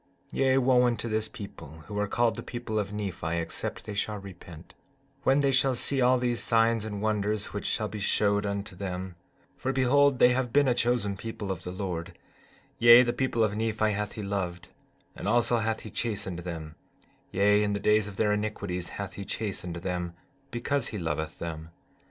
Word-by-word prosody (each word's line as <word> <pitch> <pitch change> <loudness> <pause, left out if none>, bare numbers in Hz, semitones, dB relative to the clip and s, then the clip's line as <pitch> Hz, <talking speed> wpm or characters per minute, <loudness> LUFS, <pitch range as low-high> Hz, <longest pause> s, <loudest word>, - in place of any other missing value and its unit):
15:3 - - -4
Yea, 130 -1 +4
wo 130 -1 +4
unto 120 0 -1
this 110 -1 0
people 80 -7 -10
who 105 -1 -4
are 105 - +1
called 115 +1 +2
the - - -5
people 120 -3 -3
of 100 -1 -3
Nephi 95 -5 -3
except 85 -1 -4
they 105 - -5
shall 105 +1 -1
repent, 90 -4 -11 0.5
when 135 +1 +3
they 140 -1 +3
shall 130 0 +3
see 135 +2 0
all 125 +1 +5
these 120 -1 0
signs 115 -1 +2
and 105 -1 -4
wonders 105 -1 0
which 105 - -3
shall 110 - 0
be 105 - -6
showed 100 +1 +2
unto 100 -1 -3
them; 95 -1 -4 0.4
for 130 - -2
behold, 135 +1 +4
they 125 - +7
have 125 -1 0
been 145 +2 +4
a 125 - +4
chosen 120 -4 +1
people 110 -1 -5
of 95 -2 -4
the 90 - -4
Lord; 90 -3 -4 0.6
yea, 120 +1 +9
the 120 -1 0
people 120 -2 +1
of 105 -1 +1
Nephi 110 0 +1
hath 105 0 -2
he 105 - -5
loved, 90 -3 -3 0.5
and - - -5
also 120 +2 +3
hath 110 0 -1
he 110 - -9
chastened 100 -6 -2
them; 85 -3 -6 0.6
yea, 105 +2 +4
in 105 -1 +1
the 100 - -1
days 105 0 +3
of 100 -2 -9
their 105 -1 +2
iniquities 100 -4 -3
hath 100 -2 -5
he 100 - -6
chastened 95 -4 -4
them 90 0 -3 0.3
because 135 +3 -1
he 105 - -5
loveth 80 -3 -3
them. 80 -1 -6
105 Hz, 195 wpm, -28 LUFS, 95-120 Hz, 0.6 s, yea